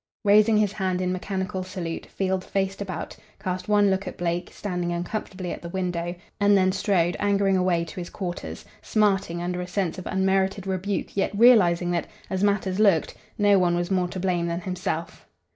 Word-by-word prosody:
Raising 210 Hz, +2 st, +6 dB
his 210 Hz, -2 st, +2 dB
hand 185 Hz, -3 st, -1 dB
in 180 Hz, 0 st, 0 dB
mechanical 190 Hz, +1 st, -3 dB
salute, 185 Hz, -3 st, -5 dB
Field 190 Hz, -1 st, -1 dB
faced 195 Hz, +1 st, -2 dB
about; 185 Hz, -4 st, -5 dB, 0.2 s
cast 185 Hz, -1 st, -4 dB
one 205 Hz, -1 st, +4 dB
look 190 Hz, +1 st, -1 dB
at -, -, -6 dB
Blake, 175 Hz, 0 st, -2 dB
standing 180 Hz, -3 st, -3 dB
uncomfortably 180 Hz, +1 st, -4 dB
at -, -, -6 dB
the 170 Hz, -, -7 dB
window, 175 Hz, -1 st, -2 dB, 0.2 s
and 205 Hz, 0 st, +5 dB
then 185 Hz, 0 st, +3 dB
strode 185 Hz, -3 st, +1 dB
angering 200 Hz, -1 st, +2 dB
away 180 Hz, -2 st, +2 dB
to 165 Hz, -, -11 dB
his 175 Hz, -, -6 dB
quarters, 180 Hz, -3 st, -6 dB, 0.2 s
smarting 195 Hz, -5 st, +1 dB
under 180 Hz, 0 st, -2 dB
a 180 Hz, -, -5 dB
sense 185 Hz, -2 st, -2 dB
of 185 Hz, -, -7 dB
unmerited 190 Hz, +1 st, +1 dB
rebuke 190 Hz, +1 st, -2 dB
yet 195 Hz, -, +1 dB
realizing 185 Hz, -7 st, +5 dB
that, 170 Hz, -1 st, -1 dB, 0.2 s
as 190 Hz, +1 st, 0 dB
matters 200 Hz, -1 st, +1 dB
looked, 195 Hz, -7 st, +3 dB, 0.2 s
no 205 Hz, -1 st, +5 dB
one 175 Hz, -1 st, +2 dB
was 175 Hz, +2 st, -2 dB
more 185 Hz, -2 st, +2 dB
to 185 Hz, -, -6 dB
blame 175 Hz, -2 st, 0 dB
than 170 Hz, +1 st, -2 dB
himself. 180 Hz, -2 st, -4 dB
185 Hz, 185 wpm, -25 LUFS, 175-200 Hz, 0.2 s, Raising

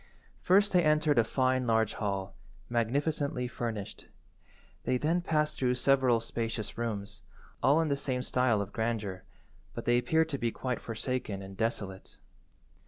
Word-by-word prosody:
First 200 Hz, +3 st, +4 dB
they 180 Hz, -1 st, +5 dB
entered 150 Hz, -3 st, +3 dB
a -, -, +5 dB
fine 130 Hz, +2 st, +1 dB
large 110 Hz, -2 st, +2 dB
hall, 95 Hz, -2 st, -3 dB, 0.4 s
magnificently 130 Hz, +2 st, 0 dB
furnished. 115 Hz, -4 st, -5 dB, 0.8 s
They 130 Hz, -, +1 dB
then 165 Hz, +6 st, +1 dB
passed 155 Hz, -3 st, 0 dB
through 125 Hz, -1 st, +2 dB
several 130 Hz, -2 st, +3 dB
spacious 115 Hz, -1 st, -4 dB
rooms, 105 Hz, -3 st, -4 dB, 0.4 s
all 145 Hz, +4 st, +5 dB
in 160 Hz, -, 0 dB
the 140 Hz, -, +2 dB
same 130 Hz, -2 st, -2 dB
style 125 Hz, -5 st, +2 dB
of 100 Hz, -, -12 dB
grandeur, 110 Hz, -5 st, -2 dB, 0.5 s
but -, -, -5 dB
they 120 Hz, 0 st, +4 dB
appeared 160 Hz, +4 st, +2 dB
to 140 Hz, -3 st, -2 dB
be 120 Hz, -, +1 dB
quite 125 Hz, +1 st, -3 dB
forsaken 115 Hz, -3 st, -3 dB
and 95 Hz, 0 st, -9 dB
desolate. 100 Hz, -3 st, -3 dB
120 Hz, 150 wpm, -30 LUFS, 110-140 Hz, 0.8 s, they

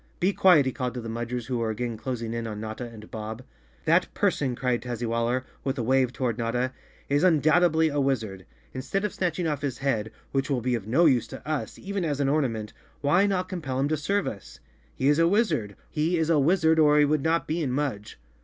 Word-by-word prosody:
"Be 190 Hz, +3 st, +2 dB
quiet!" 175 Hz, -9 st, +5 dB
he 130 Hz, -, 0 dB
called 125 Hz, -1 st, -3 dB
to -, -, -3 dB
the 115 Hz, -1 st, -6 dB
Mudgers 120 Hz, +1 st, -4 dB
who 125 Hz, -1 st, -2 dB
were 115 Hz, -1 st, -1 dB
again 115 Hz, +2 st, -3 dB
clos¬ 120 Hz, +2 st, -4 dB
ing 115 Hz, 0 st, -4 dB
in 115 Hz, -1 st, -3 dB
on 105 Hz, -1 st, -5 dB
Notta 110 Hz, +3 st, -5 dB
and 110 Hz, -2 st, -12 dB
Bob. 110 Hz, +2 st, -6 dB, 0.4 s
"That -, -, +3 dB
person," 130 Hz, -4 st, +1 dB
cried 125 Hz, -1 st, 0 dB
Tazzywaller, 120 Hz, +1 st, -1 dB, 0.2 s
with 135 Hz, +1 st, -2 dB
a 120 Hz, -, -1 dB
wave 130 Hz, +1 st, +2 dB
to¬ -, -, -17 dB
ward 120 Hz, -2 st, 0 dB
Notta, 120 Hz, +2 st, 0 dB, 0.4 s
"is 145 Hz, +3 st, +1 dB
undoubtedly 160 Hz, -1 st, +4 dB
a 145 Hz, -1 st, -1 dB
wizard. 110 Hz, -9 st, -2 dB, 0.3 s
Instead 195 Hz, +10 st, -2 dB
of 210 Hz, -, -3 dB
snatching 180 Hz, -1 st, -1 dB
off 150 Hz, -3 st, -2 dB
his 135 Hz, -4 st, -2 dB
head, 115 Hz, -6 st, -1 dB, 0.2 s
which 135 Hz, +1 st, -1 dB
will 130 Hz, -3 st, 0 dB
be 125 Hz, +2 st, 0 dB
of 110 Hz, -4 st, -3 dB
no 145 Hz, +10 st, +4 dB
use 130 Hz, -7 st, +3 dB
to -, -, -10 dB
us, 155 Hz, -2 st, -3 dB
even 200 Hz, -1 st, -3 dB
as 145 Hz, -4 st, -1 dB
an 140 Hz, -1 st, +2 dB
ornament, 115 Hz, -8 st, -1 dB, 0.3 s
why 175 Hz, +8 st, +3 dB
not 185 Hz, -2 st, 0 dB
compel 155 Hz, -9 st, -4 dB
him 140 Hz, -, +2 dB
to 155 Hz, -, +2 dB
serve 195 Hz, +7 st, 0 dB
us? 65 Hz, -, -7 dB, 0.4 s
He 135 Hz, -, 0 dB
is 145 Hz, +2 st, +4 dB
a 165 Hz, -, +5 dB
wizard, 170 Hz, -, +1 dB, 1.0 s
or 150 Hz, -1 st, +5 dB
he 150 Hz, -, +6 dB
would 150 Hz, 0 st, +1 dB
not 165 Hz, +3 st, +1 dB
be 165 Hz, +2 st, -1 dB
in 140 Hz, -5 st, -1 dB
Mudge. 125 Hz, -, -3 dB
130 Hz, 220 wpm, -26 LUFS, 115-155 Hz, 1.0 s, he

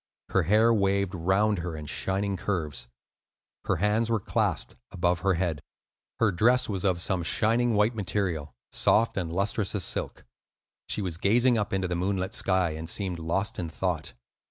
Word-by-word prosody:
Her 95 Hz, -, +3 dB
hair 110 Hz, +7 st, +4 dB
waved 100 Hz, -2 st, +1 dB
round 95 Hz, +4 st, +1 dB
her 85 Hz, -2 st, -4 dB
in 75 Hz, -, -7 dB
shining 95 Hz, +6 st, -2 dB
curves. 80 Hz, -9 st, -3 dB, 0.8 s
Her -, -, +1 dB
hands 105 Hz, +5 st, +1 dB
were 115 Hz, -1 st, +2 dB
clasped -, -, -1 dB, 0.2 s
above 90 Hz, -2 st, +1 dB
her 95 Hz, 0 st, +1 dB
head. 85 Hz, -4 st, -1 dB, 0.6 s
Her 115 Hz, -3 st, +3 dB
dress 120 Hz, +7 st, +3 dB
was 100 Hz, -3 st, -2 dB
of 95 Hz, -3 st, +1 dB
some 90 Hz, 0 st, 0 dB
shining 115 Hz, +6 st, +1 dB
white 105 Hz, +3 st, +3 dB
material, 90 Hz, -7 st, -1 dB, 0.2 s
soft 115 Hz, +1 st, +2 dB
and 85 Hz, -4 st, -2 dB
lustrous 100 Hz, +3 st, -1 dB
as 100 Hz, -, -1 dB
silk; -, -, -4 dB, 0.6 s
she 105 Hz, -, 0 dB
was 85 Hz, -3 st, -4 dB
gazing 120 Hz, +6 st, +4 dB
up 105 Hz, -1 st, -1 dB
into 95 Hz, -1 st, 0 dB
the 90 Hz, -, -2 dB
moonlit 95 Hz, +1 st, -1 dB
sky, 95 Hz, -3 st, +1 dB
and 80 Hz, +1 st, -5 dB
seemed 90 Hz, -3 st, -2 dB
lost 90 Hz, +5 st, -2 dB
in 85 Hz, -2 st, -3 dB
thought. 85 Hz, -3 st, -3 dB
95 Hz, 170 wpm, -27 LUFS, 85-105 Hz, 0.8 s, hair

